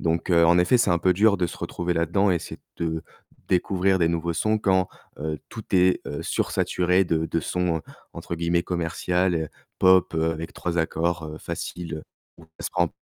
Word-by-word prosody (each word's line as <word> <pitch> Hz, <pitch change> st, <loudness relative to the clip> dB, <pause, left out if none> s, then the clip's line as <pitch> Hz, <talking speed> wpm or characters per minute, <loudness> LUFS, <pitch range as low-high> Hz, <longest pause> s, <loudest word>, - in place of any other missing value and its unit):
donc 85 Hz, +2 st, -1 dB
heu, 85 Hz, -1 st, +5 dB
en 85 Hz, +1 st, +5 dB
effet, 120 Hz, +8 st, +4 dB
c'est 115 Hz, -, +3 dB
un 85 Hz, -, +3 dB
peu 90 Hz, +2 st, +3 dB
dur 100 Hz, +3 st, +4 dB
de 90 Hz, -2 st, 0 dB
se -, -, -9 dB
retrouver 90 Hz, 0 st, -2 dB
là-dedans 85 Hz, +5 st, +2 dB
et 90 Hz, -, +3 dB
essayer -, -, -7 dB, 0.2 s
de 80 Hz, -1 st, -2 dB, 0.5 s
découvrir 95 Hz, +1 st, +2 dB
des 85 Hz, -2 st, +3 dB
nouveaux 85 Hz, 0 st, -1 dB
sons 110 Hz, +6 st, +1 dB
quand, 95 Hz, -3 st, +2 dB, 0.3 s
heu, 75 Hz, 0 st, -3 dB
tout 110 Hz, -, -7 dB
est, 90 Hz, 0 st, +4 dB
heu, 75 Hz, -, -4 dB
sursaturé 90 Hz, +1 st, +1 dB
de 80 Hz, -2 st, 0 dB
de 85 Hz, -, -1 dB
sons 85 Hz, -1 st, -1 dB, 0.3 s
entre -, -, -5 dB
guillemets 85 Hz, +1 st, +1 dB
«commercial,» 85 Hz, -1 st, -1 dB, 0.3 s
pop 95 Hz, -2 st, +5 dB
avec 80 Hz, 0 st, -1 dB
3 85 Hz, -1 st, -3 dB
accords, 80 Hz, +1 st, 0 dB
heu, -, -, -9 dB
faciles, 85 Hz, -2 st, -5 dB, 0.4 s
où 80 Hz, -, -15 dB
elle -, -, -8 dB
se -, -, -2 dB
prend 90 Hz, -2 st, +1 dB
85 Hz, 190 wpm, -25 LUFS, 80-90 Hz, 0.5 s, heu